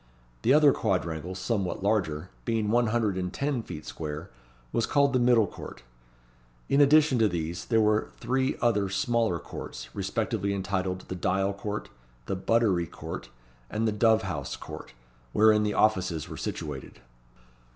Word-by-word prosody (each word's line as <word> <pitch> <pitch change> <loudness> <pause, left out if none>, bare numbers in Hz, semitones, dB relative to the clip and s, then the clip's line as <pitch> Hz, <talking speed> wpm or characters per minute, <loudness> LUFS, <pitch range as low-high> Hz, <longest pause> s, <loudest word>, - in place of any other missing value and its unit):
The 120 - +3
other 150 0 +7
quadrangle, 90 - -1
somewhat 95 -1 -2
larger, 90 -5 0
being 110 -2 0
one 120 0 +3
hundred 110 -4 +1
and 90 -1 -2
ten 140 +1 -1
feet 75 -8 -8
square, 75 -1 -6 0.4
was 115 - +1
called 140 -1 +3
the 130 - +3
Middle 120 -3 +5
Court. 90 - -10 0.9
In 140 - +4
addition 145 -2 +5
to 110 - +5
these, 85 -2 -3
there 115 -2 +3
were 105 0 +2
three 130 +1 0
other 105 -5 +2
smaller 115 -2 +1
courts, - - -8
respectively 100 0 -1
entitled 95 -1 -2
the - - -7
Dial 95 +2 0
Court, 105 +1 -5 0.4
the 95 - -2
Buttery 95 -3 +2
Court, - - -7 0.4
and 110 +1 0
the - - +2
Dove 110 +1 +3
house 80 -8 -4
Court, - - -9 0.4
wherein 110 0 +5
the 105 -1 0
offices 95 -7 +2
were - - -7
situated. 75 -3 -5
105 Hz, 150 wpm, -28 LUFS, 90-115 Hz, 0.9 s, other